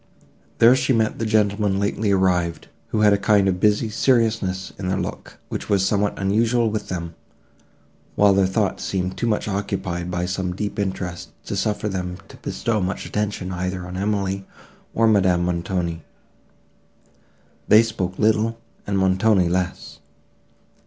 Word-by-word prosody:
There 115 +2 +7
she 130 0 +1
met 110 -2 0
the 115 - -1
gentlemen 105 -2 +1
lately 100 +1 0
arrived, 90 -3 +1 0.2
who 110 - -1
had 105 -1 +6
a 100 - +1
kind 100 -2 +3
of 90 -1 0
busy 105 +3 +2
seriousness 110 -5 +1
in 95 - -3
their 95 +1 0
looks, - - -5
which - - -5
was 100 -2 +3
somewhat 100 0 0
unusual 115 +4 +1
with 105 -1 -3
them, 85 -2 -5 1.0
while 100 -1 +5
their 95 -1 +3
thoughts 100 +1 -1
seemed 95 -1 -2
too 120 - -2
much 105 -2 0
occupied 95 -3 -3
by 90 0 -2
some 90 -1 -3
deep 105 +1 -4
interest, 95 -3 -3 0.2
to - - -4
suffer 105 0 -1
them 90 -3 -3
to - - -13
bestow 110 -3 -2
much 95 +2 -3
attention 105 -3 -3
either 90 0 -3
on 90 0 -7
Emily 100 0 -1 0.5
or 115 - +3
Madame 95 -5 +3
Montoni. 85 -1 -2 1.6
They 110 +2 +7
spoke 95 -5 -3
little, 110 +1 +2 0.3
and 100 -1 0
Montoni 95 0 +3
less. 90 0 -3
100 Hz, 150 wpm, -22 LUFS, 90-105 Hz, 1.6 s, There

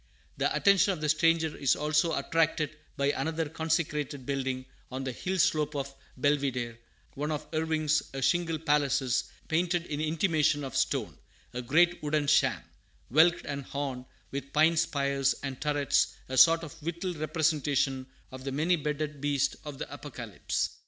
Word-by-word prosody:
The - - +1
attention 200 0 +4
of 175 - -6
the 150 - 0
stranger 160 0 +2
is 140 - +2
also 155 +2 +1
attracted 155 +1 0 0.2
by 140 0 +2
another 160 +3 -2
consecrated 150 -3 -2
building 130 -1 -2 0.3
on 130 +1 -4
the 130 - -2
hill 185 +9 -3
slope 150 -3 +2
of 140 -1 -3 0.3
Belvidere, 125 -4 0 0.3
one 150 +2 -3
of 150 -1 -3
Irving's 155 -1 +1
a 135 - -5
"shingle 165 +3 +1
palaces," 145 -4 +1 0.2
painted 170 +1 +1
in 150 -2 -3
imitation 155 -2 +1
of 135 - -6
stone, - - -1 0.3
a 125 - -3
great 175 +8 +3
wooden 150 0 0
sham, 145 - +3 0.5
"whelked 165 +5 +4
and 140 -1 -4
horned" 135 -2 -4 0.3
with 140 0 -5
pine 155 +2 +4
spires 140 -3 +1
and 135 -2 -5
turrets, 145 -2 +1
a 130 - -4
sort 165 +6 +6
of 155 -1 -10
whittled 170 +2 -3
representation 150 -4 0 0.2
of 130 0 -9
the 135 - -3
many 160 +6 +2
beaded 150 -1 -3
beast 140 -1 +1
of 145 -2 -7
the - - -5
Apocalypse. - - -4
150 Hz, 155 wpm, -29 LUFS, 140-160 Hz, 0.5 s, sort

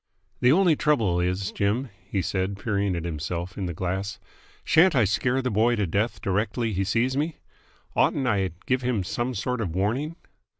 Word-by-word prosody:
"The 125 - +5
only 175 0 +5
trouble 115 -14 +2
is, 90 +2 -1
Jim," 110 +6 0
he 95 -1 -2
said, 95 +2 -1
peering 100 -2 0
at 85 -1 -4
himself 85 +3 -4
in 95 -3 -3
the 85 - -3
glass, 95 +4 -3 0.4
"shan't 170 +1 +5
I 120 - +5
scare 125 +6 +1
the 125 - 0
boy 115 +4 +3
to 105 -3 0
death 100 +7 -1
directly 110 +3 0
he 95 +1 0
sees 115 +6 +1
me? 150 +3 -1 0.6
Oughtn't 135 - +2
I 100 -6 +2
to 90 - -10
give 130 0 +1
him 120 -6 0
some 120 +7 -2
sort 125 +4 -2
of 90 -6 -3
warning?" 125 - -1
105 Hz, 185 wpm, -25 LUFS, 95-125 Hz, 0.6 s, The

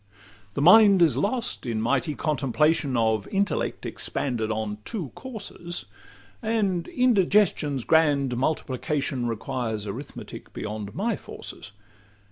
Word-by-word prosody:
The 140 - 0
mind 195 +1 +8
is 160 - +3
lost 225 - -1
in 115 -2 -1
mighty 130 +5 0
contemplation 145 -1 +1
Of 110 -3 +1
intellect 200 +1 -1
expanded 120 -5 -2
on 110 -1 -2
two 180 - -4
courses; 200 -8 -7 0.6
And 210 -6 0
indigestion's 200 - +2
grand 145 -5 +3
multiplication 135 -1 -1
Requires 115 -2 -3
arithmetic 115 +8 -8
beyond 105 -1 -5
my 220 +3 0
forces. 100 - -9
145 Hz, 105 wpm, -26 LUFS, 115-190 Hz, 0.6 s, mind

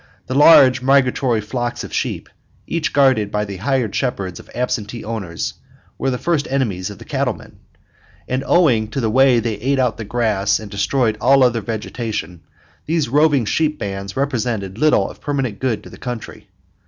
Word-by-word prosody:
The 130 - -4
large 135 -3 +7
migratory 130 -3 +2
flocks 120 +3 -3
of - - -9
sheep, - - -2 0.4
each 165 -2 -2
guarded 130 -7 +3
by 105 0 -1
the 100 -2 -7
hired 120 +1 -1
shepherds 100 -9 -2
of - - -15
absentee 120 -2 -3
owners, 100 -7 -4 0.5
were 135 - 0
the 125 - -1
first 160 0 0
enemies 105 -9 -1
of 100 - -9
the - - -12
cattlemen; - - -3 0.7
and 130 +1 -1
owing 125 -11 +3
to 110 - -4
the 110 -4 0
way 130 0 +5
they 110 -2 -3
ate 135 +5 0
out 125 -4 +1
the 115 - -5
grass 105 -3 0
and 105 -2 -10
destroyed 110 +1 0
all 135 +1 +5
other 120 -2 +2
vegetation, 110 -4 -5 0.5
these 160 -4 0
roving 145 -2 +3
sheep 155 +6 0
bands 100 -1 -5
represented 115 -7 -2
little 155 +1 +3
of - - -12
permanent 135 -8 -2
good 115 -5 -1
to - - -11
the - - -13
country. 120 -3 -7
120 Hz, 175 wpm, -19 LUFS, 105-135 Hz, 0.7 s, large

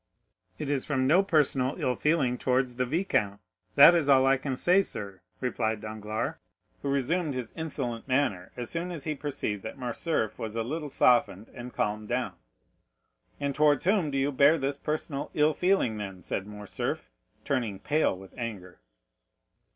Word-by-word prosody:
"It 145 - -3
is 140 -3 0
from 130 -3 0
no 165 +8 +5
personal 145 -7 +2
ill 125 - +1
feeling 140 -2 +1
towards 125 -1 0
the 125 0 0
viscount, 120 - 0 0.4
that 150 +5 +10
is 165 -5 +1
all 135 -1 +6
I 135 0 +5
can 135 -1 -3
say, 180 +6 +4
sir," 100 - -5 0.2
replied 110 -4 -1
Danglars, 110 0 -4 0.4
who 140 - -2
resumed 140 +3 0
his 125 -3 -5
insolent 135 -8 -4
manner 125 -9 0
as 120 -2 -3
soon 170 +2 -2
as 165 -6 -6
he 155 - -1
perceived 135 -8 -3
that 110 - -7
Morcerf 125 -1 -2
was 110 -1 -5
a 115 - 0
little 150 +5 -4
softened 120 -6 +2
and 125 0 -8
calmed 105 -1 -2
down. - - -1 1.1
"And 140 -1 -1
towards 150 -1 +3
whom 190 -4 +2
do 140 - -2
you 135 +2 +1
bear 145 +4 +5
this 140 0 -2
personal 150 -2 -3
ill 150 +1 +4
feeling, 180 - +1
then?" 95 -4 -7
said 95 +4 -3
Morcerf, 105 -11 -5 0.3
turning 120 -8 -1
pale 150 -5 +1
with 95 0 -13
anger. 105 -8 -6
130 Hz, 165 wpm, -28 LUFS, 110-150 Hz, 1.1 s, that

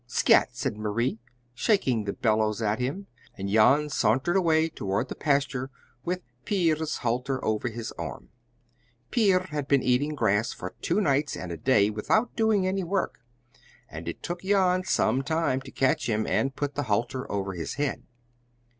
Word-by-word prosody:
"Scat!" - - +4
said 120 -2 -3
Marie, 110 +3 -1 0.3
shaking 125 - +1
the 100 - -2
bellows 110 -1 +1
at 110 0 0
him, 140 +11 -3 0.3
and 100 0 -4
Jan 135 +8 +4
sauntered 135 - +1
away 160 -4 +3
toward 105 -6 -2
the - - -5
pasture 140 -2 0 0.3
with 180 +1 -2 0.2
Pier's 160 -5 0
halter 125 +3 -1
over 110 +2 0
his 115 0 -6
arm. - - -6 0.8
Pier 195 -6 +3
had 145 -2 -3
been 140 -2 +3
eating 135 +5 +1
grass 110 -2 +1
for 90 - -7
two 185 +5 +1
nights 145 -3 +1
and 90 - -6
a - - -3
day 105 0 +3
without 215 - 0
doing 220 -4 +2
any 190 +1 0
work, 190 +3 -2 0.7
and - - -9
it - - -6
took 175 0 -4
Jan 190 -2 +2
some 135 - +2
time 145 -2 0
to 135 - -11
catch 135 -2 +1
him 110 0 0
and 135 0 0
put 145 -1 -2
the 145 - -2
halter 120 +5 -1
over 100 -1 -2
his 85 -2 -5
head. 145 -1 -2
135 Hz, 165 wpm, -27 LUFS, 110-165 Hz, 0.8 s, Scat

